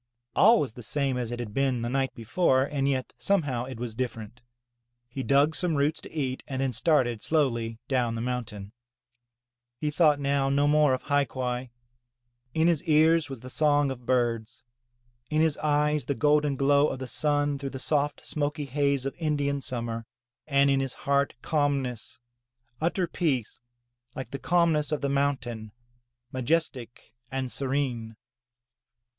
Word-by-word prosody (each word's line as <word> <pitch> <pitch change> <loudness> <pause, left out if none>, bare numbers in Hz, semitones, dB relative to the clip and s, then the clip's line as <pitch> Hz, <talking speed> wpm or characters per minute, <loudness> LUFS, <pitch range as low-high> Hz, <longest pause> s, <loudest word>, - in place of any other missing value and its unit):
All 225 +3 +6
was 130 -6 -2
the 125 - -10
same 135 +2 -1
as 120 -2 -3
it 120 - -3
had 115 -4 -6
been 130 -2 0
the - - -1
night 135 +1 0
before, 130 +3 +2
and 140 0 -1
yet 130 -2 -2
some 200 -4 +2
how 125 -4 -2
it 130 -3 -8
was 120 -2 -4
different. 115 -1 -5 0.7
He 130 +3 -5
dug 140 +4 +3
some 170 -1 -1
roots 145 +3 +1
to - - -11
eat 130 -5 -2
and 130 -2 -4
then 135 -1 0
started 120 -4 +2
slowly 120 -8 0
down 125 -4 0
the - - -3
mountain. 115 -5 -4 1.1
He 150 +4 -2
thought 150 -2 +4
now 140 -1 +1
no 140 +1 +2
more 150 -2 +4
of 130 - -9
hai 145 -1 +2
quai. 125 0 -3 0.9
In 160 +1 +3
his 170 -4 +2
ears 160 -1 +4
was 135 -4 -7
the 130 - -9
song 145 -2 +2
of 125 -2 -9
birds, 120 -2 0 0.7
in 155 - +1
his 160 -2 +3
eyes 150 -2 +1
the 140 - -1
golden 150 -1 +2
glow 140 +2 +4
of 135 - -3
the 130 - -5
sun 145 +1 0
through 140 -1 -4
the 135 - -6
soft 145 +2 0
smoky 145 0 -2
haze 140 -1 0
of 135 - -2
Indian 145 -3 0
summer, 115 -3 -4 0.4
and 140 -1 +4
in 135 - +3
his 135 -1 -2
heart 140 0 +2
calmness, 140 -7 -1 0.6
utter 175 +3 +1
peace, 150 - -2 0.6
like 130 -2 -6
the 140 - -5
calmness 165 -2 +2
of 150 - -1
the 140 - 0
mountain, 130 -6 -1 0.6
majestic 130 -4 -2 0.2
and 130 -1 -2
serene. 130 -5 -2
140 Hz, 165 wpm, -27 LUFS, 125-150 Hz, 1.1 s, All